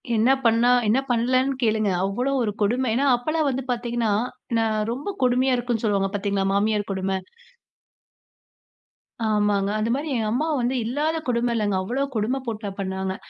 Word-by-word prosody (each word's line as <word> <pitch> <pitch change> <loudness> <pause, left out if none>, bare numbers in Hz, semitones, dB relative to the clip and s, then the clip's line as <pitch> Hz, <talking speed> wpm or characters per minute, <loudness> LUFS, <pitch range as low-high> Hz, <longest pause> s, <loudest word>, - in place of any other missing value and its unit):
என்ன 225 +3 +3 0.2
பண்ணா, 230 +1 +4 0.2
என்ன 225 +5 +3
பண்ணலன்னு 255 +3 +2
கேளுங்க. 215 -2 +2 0.2
அவ்ளோ 245 +8 -1
ஒரு 215 - 0
கொடுமை. 245 +5 +1
ஏன்னா, 265 +5 +1
அப்பல்லாம் 310 +5 -1
வந்து 265 0 -2
பார்த்தீங்கன்னா, 235 -2 -1 0.5
நான் 220 -1 +1
ரொம்ப 285 +12 -4
கொடுமையா 255 +1 +3
இருக்குன்னு 240 -2 -2
சொல்லுவாங்க 200 -2 +1
பார்த்தீங்களா? 200 -1 -1
மாமியார் 205 +1 +1
கொடும. 190 0 -2 2.2
ஆமாங்க. 205 -2 +1
அந்தமாரி 235 +8 -1
எங்க 225 -2 0
அம்மா 280 +8 0
வந்து 245 +2 0
இல்லாத 295 +8 -1
கொடும 240 0 +1
இல்லங்க. 205 -3 0
அவ்ளோ 250 +8 -1
கொடும 225 +5 0
போட்டா 215 -3 -4
பண்ணாங்க. 190 -1 -3
230 Hz, 145 wpm, -24 LUFS, 210-255 Hz, 2.2 s, பண்ணா